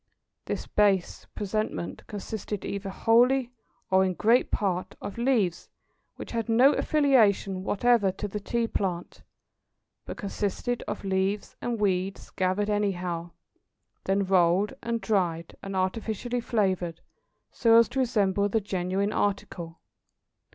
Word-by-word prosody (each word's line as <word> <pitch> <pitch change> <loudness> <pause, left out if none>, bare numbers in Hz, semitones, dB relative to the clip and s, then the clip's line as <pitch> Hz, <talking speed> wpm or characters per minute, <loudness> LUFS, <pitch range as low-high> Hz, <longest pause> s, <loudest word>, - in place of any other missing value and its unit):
This - - -3
"base 200 -4 +1
presentment" 210 -3 -3
consisted 210 -1 -5
either 200 0 -4
wholly, 245 +5 +3 0.4
or 190 0 +5
in 185 -1 0
great 230 +6 +3
part, 185 -3 -1
of 205 - -7
leaves 225 -9 +1 0.5
which - - -8
had 230 0 -2
no 250 +6 +6
affiliation 215 -10 +2
whatever 210 -1 +3
to 205 - -4
the 210 +1 -4
Tea 235 +3 -1
plant, 180 -5 -3 0.9
but - - -6
consisted 205 +4 -2
of - - -4
leaves 195 +1 -1
and 235 -2 -2
weeds 190 -1 -1
gathered 190 +3 0
anyhow, 180 -5 -1 0.8
then 195 +1 +1
rolled 185 +1 +3
and 230 -1 -2
dried, 170 -6 -1
and 195 0 -6
artificially 220 +5 -2
flavoured 185 -8 -1 0.5
so 230 -2 +4
as 230 - +6
to 270 - -3
resemble 205 -5 +1
the 225 - +2
genuine 195 0 -1
article. 175 -4 -2
200 Hz, 125 wpm, -27 LUFS, 190-225 Hz, 0.9 s, no